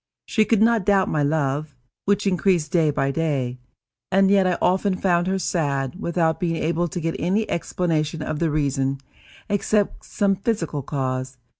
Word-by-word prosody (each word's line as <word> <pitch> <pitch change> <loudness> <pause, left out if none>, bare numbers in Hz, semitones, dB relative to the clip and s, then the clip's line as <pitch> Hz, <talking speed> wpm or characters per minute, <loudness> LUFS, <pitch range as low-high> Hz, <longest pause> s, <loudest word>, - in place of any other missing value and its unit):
She 215 -2 +2
could 220 -1 +3
not 230 -2 +3
doubt 195 0 +3
my 150 - 0
love, 145 -1 -1 0.3
which 200 +1 +1
increased 180 -4 +1
day 165 -3 +3
by 140 -1 0
day, 135 -5 -1 0.5
and 195 +1 +4
yet 195 -2 +4
I 180 - +1
often 190 +1 +2
found 175 -2 +1
her 190 0 +1
sad, 140 -8 -1
without 170 -4 0
being 170 -2 0
able 170 +2 0
to 175 - -5
get 165 0 -2
any 205 +5 0
explanation 165 -2 -1
of 150 0 -3
the 165 - +1
reason, 140 -2 0 0.5
except 205 0 0
some 200 -1 0
physical 180 -9 -2
cause. 130 -1 -3
165 Hz, 165 wpm, -23 LUFS, 145-195 Hz, 0.5 s, and